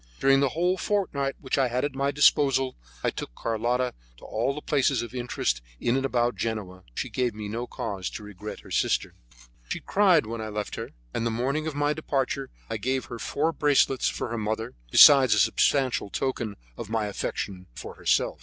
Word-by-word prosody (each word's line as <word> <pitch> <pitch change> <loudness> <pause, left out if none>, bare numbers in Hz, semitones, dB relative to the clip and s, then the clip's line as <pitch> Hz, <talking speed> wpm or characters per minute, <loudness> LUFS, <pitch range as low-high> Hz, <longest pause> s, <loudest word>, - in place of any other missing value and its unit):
During 135 0 +5
the 140 -1 +3
whole 180 +6 +1
fortnight 145 -10 -1
which 130 0 -1
I 130 - +3
had 125 +3 0
at 145 - -3
my 140 +1 0
disposal, 135 -2 +3 0.3
I - - +2
took - - -7
Carlotta 120 +3 -1 0.2
to - - -14
all 120 +5 -1
the 150 - -6
places 135 -5 +1
of 120 - -8
interest 120 - -1 0.2
in 120 - +1
and 135 0 +1
about 120 -1 +1
Genoa. 100 -5 -4
She - - -2
gave 125 -4 -1
me 105 -1 -5
no 115 +4 -4
cause 95 -3 -4
to 105 - -11
regret 105 +1 -8
her - - -15
sister. - - +1 0.6
She - - -2
cried 190 -6 +3
when 115 +1 -5
I 110 - -4
left 105 -1 -4
her, - - -5 0.2
and - - -1
the 115 - +1
morning 135 +7 -1
of 155 - -4
my 145 +1 +1
departure 140 -2 -2 0.2
I 115 - -3
gave 130 +4 -1
her 120 - -8
four 155 +7 0
bracelets 145 -4 +3
for - - -4
her 115 0 -3
mother, 110 +2 -2 0.2
besides 130 - +8
a - - +2
substantial 130 -4 +2
token 120 -3 -2 0.2
of - - -6
my 110 -1 0
affection 95 -2 -4
for - - -7
herself. - - +1
125 Hz, 200 wpm, -26 LUFS, 110-140 Hz, 0.6 s, besides